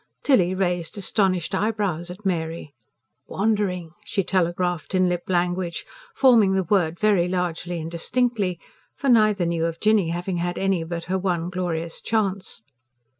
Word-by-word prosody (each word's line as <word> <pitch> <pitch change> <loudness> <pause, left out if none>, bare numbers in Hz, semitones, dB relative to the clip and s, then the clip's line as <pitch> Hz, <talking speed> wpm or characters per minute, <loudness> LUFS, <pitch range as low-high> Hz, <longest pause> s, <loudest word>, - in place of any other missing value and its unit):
Tilly 185 -10 +3
raised 180 0 -1
astonished 190 -3 0
eyebrows 200 -6 -1
at 185 +4 -10
Mary. 165 -4 -2 0.5
"Wandering!" 195 -5 -1
she 200 -4 -1
telegraphed 175 0 0
in 185 0 +4
lip 175 -1 -1
language, 175 -1 -1 0.3
forming 230 -8 +5
the 190 0 +1
word 175 -3 +1
very 200 -5 +3
largely 180 -1 -2
and 160 +1 -6
distinctly; 200 0 0 0.4
for 275 - -1
neither 215 -6 +4
knew 170 -1 0
of 165 0 -5
Jinny 210 -5 +3
having 175 +2 -2
had 175 +1 -2
any 195 -3 +1
but 170 0 -5
her 190 +2 -1
one 175 -2 -1
glorious 170 -2 -3
chance. 200 -4 -2
180 Hz, 145 wpm, -24 LUFS, 170-200 Hz, 0.5 s, forming